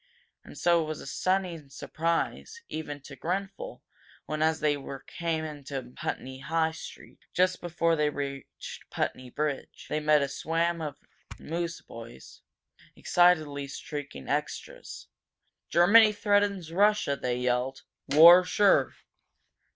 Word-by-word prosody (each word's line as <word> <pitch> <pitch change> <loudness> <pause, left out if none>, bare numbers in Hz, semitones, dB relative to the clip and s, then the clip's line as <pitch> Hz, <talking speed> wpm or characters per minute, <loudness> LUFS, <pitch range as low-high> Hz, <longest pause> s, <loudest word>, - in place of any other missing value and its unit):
And - - -13
so 170 -1 +3
it 155 - -3
was 155 -1 -4
a - - -9
stunning 175 -2 -1
surprise, 170 - -3
even 145 -2 -6
to 140 0 -11
Grenfel, 195 - -4 0.4
when, 155 0 -3
as 160 0 +2
they 150 -1 +2 0.3
came 165 -2 -2
into 140 -4 -7
Putney 130 0 -5
High 160 +2 0
street, 160 - -11 0.2
just 185 0 +2
before 170 -1 +1
they 150 -1 +2
reached 140 -1 -7
Putney 130 -1 -3
Bridge, 145 +1 -4
they 155 - 0
met 150 -1 +4
a - - 0
swam 165 +4 -1
of 150 -2 -5 0.4
newsboys 160 - -7 0.5
excitedly 155 -6 +2
shrieking 145 - -7
extras. - - -4 0.6
"Germany 210 +6 +6
threatens 205 -4 +1
Russia!" 205 -6 +3
they 125 -2 -2
yelled. 125 +1 -1 0.3
"War 170 +5 +9
sure!" 200 +2 +3
160 Hz, 120 wpm, -28 LUFS, 140-175 Hz, 0.6 s, War